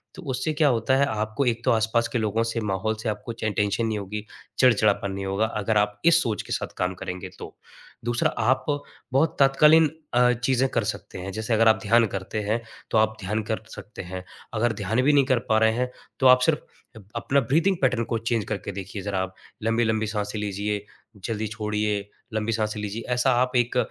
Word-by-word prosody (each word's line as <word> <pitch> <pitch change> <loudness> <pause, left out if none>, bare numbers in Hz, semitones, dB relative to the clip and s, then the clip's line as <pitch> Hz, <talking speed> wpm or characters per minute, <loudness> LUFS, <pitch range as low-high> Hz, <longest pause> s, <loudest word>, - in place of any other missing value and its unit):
तो 185 - -9
उससे 130 +5 -1
क्या 150 0 +3
होता 120 +1 +2
है 140 - +4
आपको 110 +3 -1
एक 115 -1 0
तो - - +4
आस-पास 115 +1 +2
के 125 - -2
लोगों 110 +1 +1
से 115 0 -2
माहौल 105 +1 -1
से 115 - -1
आपको 105 +2 -4
चाहे 110 -2 -2
टेंशन 105 +2 0
नहीं 110 -1 -1
होगी, 105 +2 -5 0.3
चिड़चिड़ापन 105 -5 +3
नहीं 95 0 -4
होगा। 100 +3 +1
अगर 110 -1 -1
आप 105 0 +1
इस 170 0 +6
सोच 110 -4 -1
के - - -5
साथ - - -3
काम 90 0 0
करेंगे 90 0 -6
तो। - - -9 0.5
दूसरा 120 0 +1
आप 120 +4 +2 0.5
बहुत 150 +5 +2
तत्कालीन 150 +3 +6 0.2
अ, 125 0 +5
चीज़ें 125 +2 +1
कर - - 0
सकते - - -5
हैं 95 +2 -5
जैसे 110 +4 -2
अगर 115 +1 +4
आप 110 - +5
ध्यान 115 +2 +4
करते 95 +2 -4
हैं, 110 +3 -1 0.3
तो - - +3
आप 110 0 +3
ध्यान 105 +3 -1
कर 110 +1 -3
सकते 105 - -9
हैं। 90 0 -7 0.3
अगर 115 +1 +1
ध्यान 110 +5 0
भी 145 +3 +4
नहीं 140 -2 +5
कर 130 -2 +2
पा 110 - +4
रहे 110 0 +4
हैं, 125 +2 -1 0.3
तो 130 - +5
आप 125 0 +8
सिर्फ़ 150 +4 +3 0.4
अप 105 -3 -13
अपना 135 +4 +2
ब्रीदिंग 165 +10 +2
पैटर्न 125 -3 +2
को 115 - -1
चेंज़ 115 -1 -1
करके 100 -2 -4
देखिए 100 +1 -6
ज़रा 100 -1 -2
आप। 95 0 -7 0.3
लंबी-लंबी 110 -1 +1
साँसें 105 0 -3
लीजिए, 105 0 -2 0.4
जल्दी 110 -1 -2
छोड़िए, 105 -1 -2 0.2
लंबी 110 +1 -1
साँसें 110 -1 -1
लीजिए, 105 +2 -4
ऐसा 125 +2 +2
आप 125 +1 0
एक 125 +1 +2
110 Hz, 210 wpm, -25 LUFS, 105-125 Hz, 0.5 s, आप